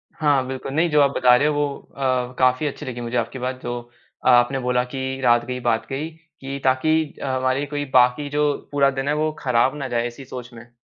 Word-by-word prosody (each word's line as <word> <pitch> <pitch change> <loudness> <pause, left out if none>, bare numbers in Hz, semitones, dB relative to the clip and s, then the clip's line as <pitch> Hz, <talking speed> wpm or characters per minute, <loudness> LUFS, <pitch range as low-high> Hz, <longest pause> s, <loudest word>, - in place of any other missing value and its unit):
हाँ, 145 -4 +2
बिल्कुल, 135 0 -5
नहीं 165 +2 +2
जो 150 -1 +4
आप 140 -1 +4
बता 125 -1 +5
रहे 145 +4 +3
हो, 150 - +1
वो 145 -1 -1 0.2
अ, 130 -2 -1
काफ़ी 130 +3 +3
अच्छी 140 - -6
लगी 120 -1 -5
मुझे 120 +1 -2
आपकी 120 +3 -2
बात 130 +1 -4
जो 120 0 -3 0.5
आपने 125 +2 +4
बोला 125 0 +1
कि 130 0 -3
रात 120 -1 +4
गई, 125 0 -4
बात 115 -2 0
गई 145 +4 -3
कि 155 -4 -9
ताकि 130 +4 +2 0.3
अ, - - -3
हमारी 130 +2 0
कोई 145 0 -3
बाकी 125 +3 +4
जो 150 0 +2 0.2
पूरा 140 -1 +3
दिन 135 +1 -3
है, 145 - +2
वो 155 0 0
ख़राब 130 +1 +2
ना 135 -2 -4
जाए 120 -1 -1
इसी 125 +3 -10
सोच 125 -1 -8
में। 115 +1 -13
130 Hz, 225 wpm, -22 LUFS, 125-145 Hz, 0.5 s, बता